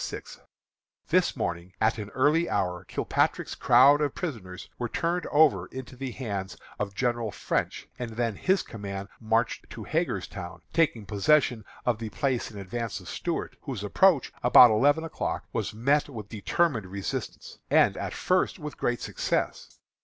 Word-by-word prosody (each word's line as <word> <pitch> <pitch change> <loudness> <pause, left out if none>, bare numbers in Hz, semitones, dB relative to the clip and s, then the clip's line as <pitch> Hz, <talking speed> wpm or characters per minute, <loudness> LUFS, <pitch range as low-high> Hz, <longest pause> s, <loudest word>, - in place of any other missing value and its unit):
_ - - -6 0.7
This - - +3
morning, 85 +2 -3
at 110 +1 +2
an 105 -1 -6
early 150 +6 +3
hour, 90 -2 -1
Kilpatrick's - - 0
crowd 140 +5 +6
of 145 -2 0
prisoners 110 - -6
were 120 -1 -2
turned 170 +5 -1
over 155 0 +4
into 130 0 -8
the 135 +1 -5
hands 100 -6 -5 0.2
of 100 -1 -3
General 120 -2 0
French, - - -2
and 120 -2 -3
then 115 -2 -1
his 190 - +1
command 100 -2 -6
marched 115 +1 0
to - - -8
Hagerstown, 85 0 -3
taking 145 -10 +2
possession 110 +3 +2 0.2
of 120 -3 +1
the 115 -1 -4
place 130 +2 -1
in 105 - -11
advance 100 +2 -4
of 90 - -13
Stuart, 170 -2 -3
whose 125 -9 -5
approach 160 - +3
about 125 -1 +8
eleven 145 +8 +3
o'clock 165 - -3
was - - -1
met 140 +7 +1
with 110 -6 -8
determined 115 - 0
resistance, 95 +1 -5
and, - - +4
at - - -4
first, 185 0 +1
with 150 -3 -7
great 120 0 0
success. - - -2
120 Hz, 155 wpm, -27 LUFS, 105-145 Hz, 0.7 s, about